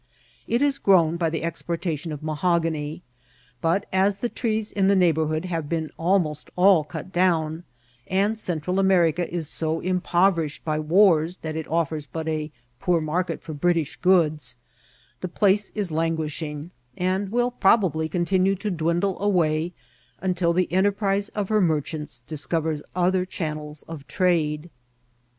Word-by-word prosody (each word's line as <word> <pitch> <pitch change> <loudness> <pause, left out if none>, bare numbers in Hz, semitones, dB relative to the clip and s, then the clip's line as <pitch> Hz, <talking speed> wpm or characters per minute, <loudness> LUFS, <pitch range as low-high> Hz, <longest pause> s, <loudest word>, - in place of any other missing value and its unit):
It 235 +3 +1
has 285 -1 +2
grown 170 -4 +4
by 170 -2 +1
the 160 0 -3
exportation 165 -1 -3
of 150 0 -6
mahogany; 160 -1 -1 0.6
but, 170 +5 +1
as 195 +1 +3
the 240 +4 -2
trees 220 -3 -2
in 195 -2 +1
the 200 - +4
neighbourhood 160 -3 +2
have 165 -5 -3
been 160 -2 -2
almost 165 -4 0
all 180 -3 +5
cut 150 +5 -8
down, 165 -2 +1 0.4
and 205 +4 +1
Central 180 -1 -1
America 180 -3 +2
is 170 -3 -2
so 160 +2 -1
impoverished 180 -3 +1
by 155 -1 0
wars 170 0 +4
that 155 -1 -4
it 160 -1 -4
offers 160 -2 -1
but 160 +4 -5
a 155 -1 -2 0.3
poor 175 -2 +2
market 165 +2 -2
for 155 - -6
British 165 0 0
goods, 155 -9 +2 0.6
the - - -4
place 205 +3 +2
is 200 -5 -1
languishing, 155 -1 -2 0.3
and 190 +2 0
will 245 +1 +1
probably 185 -8 +2
con 175 +2 0
tinue 190 +2 +2
to 210 +2 -3
dwindle 175 +3 0
away 170 -5 +1 0.5
until 180 -2 +1
the 180 0 0
enterprise 200 +1 +1
of 205 -3 -2
her 215 -1 +3
mer« 160 -4 +3
chants 150 -5 -5
discovers 155 +3 -2
other 180 +1 +2
channels 155 -4 -5
of 155 -4 -9
trade. 165 -3 0
170 Hz, 150 wpm, -24 LUFS, 155-190 Hz, 0.6 s, all